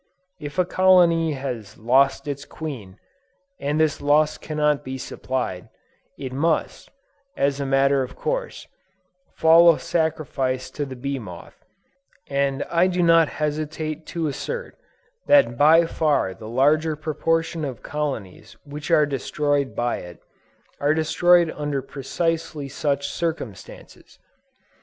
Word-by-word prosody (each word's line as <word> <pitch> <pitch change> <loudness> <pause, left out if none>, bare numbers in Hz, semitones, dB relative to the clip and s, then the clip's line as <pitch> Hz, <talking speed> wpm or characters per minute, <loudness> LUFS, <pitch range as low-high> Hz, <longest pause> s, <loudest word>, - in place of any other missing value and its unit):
If 145 +1 -8
a 180 - +3
colony 175 -4 +4
has 125 -6 -6
lost 135 +6 +2
its 140 -1 -4
queen, 120 -15 -8 0.6
and 145 +2 -1
this 155 -2 +1
loss 150 +2 +2
cannot 150 -1 0
be 130 0 -5
supplied, 125 -7 -4 0.5
it 130 -2 -6
must, 155 +4 -1 0.5
as 140 0 +1
a 140 - -2
matter 135 0 +3
of 130 - -5
course, - - -3 0.7
fall 165 +1 +7
a 165 - -1
sacrifice 135 -6 -2
to 145 - -3
the 130 - -7
bee 140 +2 -4
moth: 90 -7 -11 0.6
and 140 0 0
I 170 +2 +4
do 180 -1 0
not 165 -1 +5
hesitate 155 +1 -4
to 170 -2 -3
assert 480 - -4 0.5
that 285 - +5
by 160 +6 +6
far 150 -12 0
the 110 +3 -10
larger 150 +6 +2
proportion 165 +1 -1
of 135 -5 -5
colonies 135 -11 -5
which 145 0 -8
are 150 - +5
destroyed 145 0 -1
by 120 0 -1
it, 90 -1 -10 0.6
are 145 +2 +2
destroyed 170 +1 +3
under 145 -2 -3
precisely 150 +1 -3
such 140 0 -1
circumstances! 160 - -6
145 Hz, 130 wpm, -23 LUFS, 135-160 Hz, 0.7 s, fall